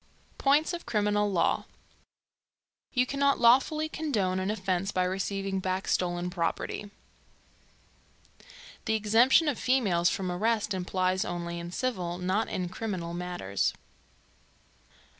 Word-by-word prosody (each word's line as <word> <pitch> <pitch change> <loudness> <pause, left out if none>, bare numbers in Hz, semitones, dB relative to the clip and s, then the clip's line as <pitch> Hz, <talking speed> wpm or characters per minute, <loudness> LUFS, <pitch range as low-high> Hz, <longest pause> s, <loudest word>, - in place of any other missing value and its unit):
POINTS 290 +5 +3
OF 340 -5 -6
CRIMINAL 210 -2 +1
LAW. 175 -3 +1 1.3
You 250 -1 +2
cannot 280 +1 +1
lawfully 270 +6 +4
condone 215 -13 -1
an 190 +1 -2
offence 190 -2 -1
by 185 - +1
receiving 195 +1 -2
back 185 +1 -2
stolen 175 0 0
property, 180 +3 -3 2.0
The 220 - +1
exemption 230 +9 +4
of 285 -6 0
females 200 -10 +2
from 185 -2 -2
arrest 215 +3 0
applies 185 0 0
only 170 0 -4
in 170 0 -7
civil, 180 -7 -2
not 185 +4 0
in 180 -1 -2
criminal 185 -4 -4
matters. 175 - -2
195 Hz, 115 wpm, -29 LUFS, 180-235 Hz, 2.0 s, lawfully